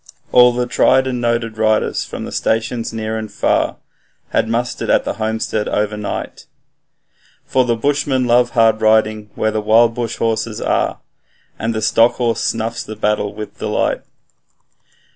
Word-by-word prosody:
All 125 0 +7
the 125 0 -1
tried 130 +2 +3
and 125 -2 -2
noted 115 -2 -1
riders 110 -1 +1
from - - -7
the - - -7
stations 115 +1 -1
near 110 0 -3
and 110 -1 -7
far 100 - 0 0.5
Had 110 - 0
mustered 120 +1 -2
at - - +3
the - - -3
homestead 110 -1 -1
overnight, 105 0 -3 1.0
For 130 -1 +2
the 120 -1 +1
bushmen 140 0 0
love 120 0 +3
hard 110 -1 +4
riding 110 -1 +2
where 110 - 0
the 110 0 -1
wild 115 +2 +4
bush 120 -1 -3
horses 115 -1 -1
are, - - -1 0.6
And 115 0 -2
the 110 - -2
stock 115 +2 +4
horse 120 -2 -1
snuffs 115 +1 -2
the 110 - -8
battle 105 -1 -1
with 105 0 -8
delight. - - -1
115 Hz, 155 wpm, -18 LUFS, 110-120 Hz, 1.0 s, All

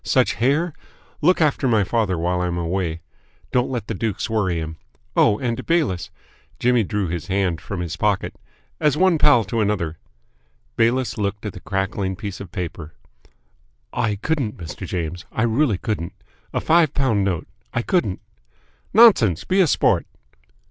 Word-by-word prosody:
Such - - +2
hair! 145 - +1 0.5
Look 180 +3 +4
after 145 -3 +2
my 110 -4 +3
father 100 -2 0
while 90 +2 0
I 90 - 0
am 85 0 -2
away. 85 -1 -2 0.5
Don't 125 0 +1
let 125 -5 -3
the 110 - -3
dukes 110 +1 -2
worry 95 -6 +1
him. 80 0 -5 0.4
Oh, 105 - +4
and, 120 -2 -2
Bayliss" 110 - 0 0.5
Jimmy 125 -1 +3
drew 105 -1 -1
his 85 -1 -4
hand 95 -3 0
from 95 -3 -5
his 85 0 -4
pocket 105 +1 0 0.5
"as 150 -1 +2
one 180 -2 +4
pal 145 -7 +5
to 115 +2 -2
another 95 -6 -1 0.4
" - - -41
Bayliss 120 0 +1
looked 105 +1 -2
at 105 - -4
the - - -9
crackling 95 0 -2
piece 100 -1 -6
of 100 -4 -9
paper. 80 -3 -6 1.0
"I 105 -3 0
couldn't, 130 0 -2
Mr. 80 -3 -7
James, 85 0 -4
I 110 - -1
really 120 -1 +2
couldn't! 95 -6 -3 0.4
A - - -1
five 160 -3 +3
pound 120 -8 +2
note! 95 -4 -1 0.2
I 120 - -1
couldn't!" 145 - 0 0.7
"Nonsense! 160 - +6
Be 190 +1 +2
a 180 - +4
sport!" - - +2
105 Hz, 165 wpm, -22 LUFS, 90-125 Hz, 1.0 s, Nonsense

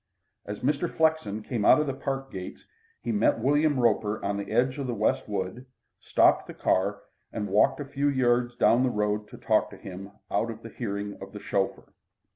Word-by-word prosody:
As 105 0 -5
Mr. 145 +5 0
Flexen 160 -10 +1
came 115 -2 -2
out 130 - +7
of 150 - +1
the 135 - -2
park 135 0 -4
gates 90 -1 -8 0.4
he 120 - -1
met 110 +1 +3
William 145 +4 +2
Roper 110 -2 +2
on 100 0 0
the 100 - -5
edge 130 +3 +1
of 135 - -3
the 120 - -2
West 105 0 0
wood, 100 +5 -4 0.3
stopped - - +3
the - - -9
car, - - 0 0.3
and 105 - -3
walked 100 +8 +3
a 145 - -4
few 140 +1 0
yards 120 -2 +2
down 120 0 +4
the 130 - +3
road 105 -1 -1
to - - -12
talk - - +2
to - - -12
him 95 +1 -8 0.2
out 115 - +1
of 115 0 -8
hearing 100 -3 -4
of 95 0 -9
the 105 - -7
chauffeur. 100 -1 -2
115 Hz, 200 wpm, -27 LUFS, 105-135 Hz, 0.4 s, out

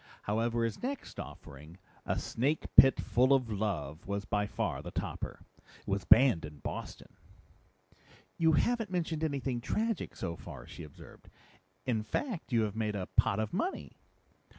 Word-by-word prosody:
However, 115 +2 0
his 115 -2 -2
next 275 +2 -4
offering, 75 +5 -10 0.3
A - - +1
Snake 140 +7 -1
Pit 135 - +8
Full 130 +3 +3
of 125 -4 -1
Love, 95 -7 -3
was 100 0 -2
by 105 0 0
far - - -2
the - - -7
topper. - - -5 0.3
It - - -26
was 100 0 -1
banned 115 -5 +6
in 75 -1 -8
Boston." - - -7 1.2
"You 160 -1 +4
haven't 230 +7 +2
mentioned 165 -3 -1
anything 135 -5 -1
tragic 225 - -1
so 85 -3 -3
far," - - -10
she - - -10
observed. 75 - -13 0.6
"In 115 -4 +1
fact, 180 - -3
you 115 -2 +3
have 105 -1 -2
made 110 -2 -1
a 95 -2 -4
pot 110 -2 +3
of 110 - -2
money." 340 - -3
115 Hz, 155 wpm, -32 LUFS, 100-155 Hz, 1.2 s, Pit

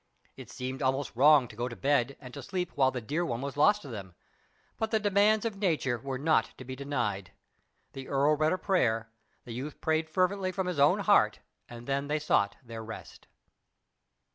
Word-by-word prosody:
It - - -11
seemed 130 +2 -5
almost 135 -1 -1
wrong 140 0 +6
to 105 - -13
go 120 +2 -2
to 120 - -7
bed 140 -1 +1
and 125 -2 -11
to 140 - -7
sleep 180 +5 -3
while 135 -2 +3
the 125 -2 -4
dear 150 +10 -2
one 120 -8 -2
was 140 0 -5
lost 205 +8 +4
to - - -9
them, 100 -8 -8 0.6
but 220 - 0
the 220 - +2
demands 210 +1 +3
of 220 -3 -3
nature 155 - 0
were 135 +2 -4
not 155 +4 +1
to 130 - -10
be 130 +1 -6
denied. 120 -9 -3 0.6
The 135 -1 -8
earl 140 +2 +3
read 155 +1 +2
a 185 - +1
prayer, 115 - 0 0.3
the 120 - -7
youth 135 +5 -6
prayed 160 0 0
fervently 185 +3 +1
from 190 0 -2
his 180 -5 -3
own 140 - +4
heart, - - +4 0.3
and 120 0 -10
then 140 +1 -1
they 150 +1 0
sought 100 -9 +1
their 115 -2 -8
rest. 110 0 -10
140 Hz, 200 wpm, -29 LUFS, 125-165 Hz, 0.6 s, wrong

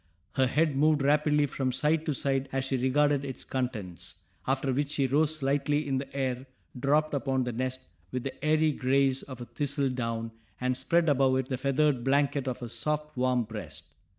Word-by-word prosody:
Her 130 -2 +3
head 150 +2 +1
moved 150 0 +3
rapidly 150 +1 +3
from 135 -2 -2
side 150 +5 +1
to 150 - +1
side 135 0 0
as 135 0 -1
she 135 - -1
regarded 140 +2 +2
its 135 -2 -5
contents, 110 -9 -4 0.3
after 135 0 +1
which 140 +2 0
she 140 -2 +1
rose 150 +2 +1
lightly 145 +2 +1
in 135 -1 0
the 140 - -7
air, 130 -1 -2 0.3
dropped 150 +4 +2
upon 135 -2 0
the 125 - -2
nest 130 +2 -3 0.3
with 125 -1 -3
the 135 - -6
airy 155 0 +3
grace 135 0 +2
of 130 -3 -9
a - - -5
thistledown, 125 -5 -2 0.3
and 125 0 0
spread 165 +6 +1
above 135 -2 +3
it 130 -1 -2
the 130 - -1
feathered 140 -1 +2
blanket 140 0 +1
of 125 -1 -3
her 120 - -4
soft, 150 +5 -3
warm 125 -1 +2
breast. 105 - -9
135 Hz, 185 wpm, -29 LUFS, 130-145 Hz, 0.3 s, Her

